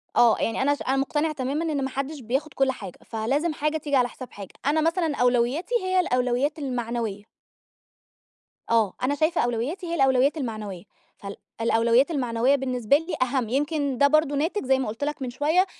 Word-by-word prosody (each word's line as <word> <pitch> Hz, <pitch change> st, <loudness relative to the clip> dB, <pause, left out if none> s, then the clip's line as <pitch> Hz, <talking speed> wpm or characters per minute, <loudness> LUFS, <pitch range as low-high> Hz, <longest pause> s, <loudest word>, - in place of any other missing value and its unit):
آه. 235 Hz, -2 st, +5 dB
يعني 225 Hz, +2 st, -1 dB
أنا 285 Hz, +2 st, +3 dB
ش -, -, -14 dB
أنا 265 Hz, -, +2 dB
مُقتنعة 295 Hz, +3 st, 0 dB
تمامًا 280 Hz, +4 st, -2 dB
إن 280 Hz, -2 st, -1 dB
ما 265 Hz, -, -1 dB
حدّش 275 Hz, +3 st, -4 dB
بياخد 265 Hz, +6 st, -2 dB
كل 270 Hz, -1 st, +2 dB
حاجة، 195 Hz, -8 st, -9 dB
فلازم 275 Hz, +9 st, -1 dB
حاجة 305 Hz, +1 st, -1 dB
تيجي 290 Hz, -2 st, -2 dB
على 250 Hz, -1 st, +4 dB
حساب 255 Hz, 0 st, -10 dB
حاجة. 200 Hz, -2 st, -10 dB
أنا 305 Hz, +2 st, +2 dB
مثلًا 330 Hz, -2 st, +1 dB
أولويّاتي 250 Hz, -, +1 dB
هي 370 Hz, 0 st, +2 dB
الأولويّات 255 Hz, 0 st, 0 dB
المعنوية. 235 Hz, -6 st, -3 dB, 1.5 s
آه. 225 Hz, -5 st, +3 dB
أنا 285 Hz, +3 st, +1 dB
شايفة 315 Hz, +3 st, +1 dB
أولويّاتي 245 Hz, -, -2 dB
هي 340 Hz, -, -2 dB
الأولويّات 270 Hz, +1 st, +3 dB
المعنوية. 215 Hz, -, -5 dB, 0.3 s
فال 200 Hz, 0 st, -8 dB, 0.3 s
الأولويّات 235 Hz, +6 st, +3 dB
المعنوية 250 Hz, -2 st, +2 dB
بالنسبة 255 Hz, -1 st, +2 dB
لي 325 Hz, +4 st, -5 dB
أهَم، 255 Hz, -3 st, 0 dB
يمكن 285 Hz, 0 st, -1 dB
ده 280 Hz, +2 st, +5 dB
برضه 305 Hz, -1 st, +2 dB
ناتج 320 Hz, +3 st, -1 dB
زي 265 Hz, 0 st, +3 dB
ما 260 Hz, -, -2 dB
قُلت 225 Hz, +6 st, -5 dB
لك 295 Hz, -1 st, -3 dB
من 255 Hz, -, -2 dB
شوية 310 Hz, +9 st, +2 dB
270 Hz, 180 wpm, -25 LUFS, 240-300 Hz, 1.5 s, آه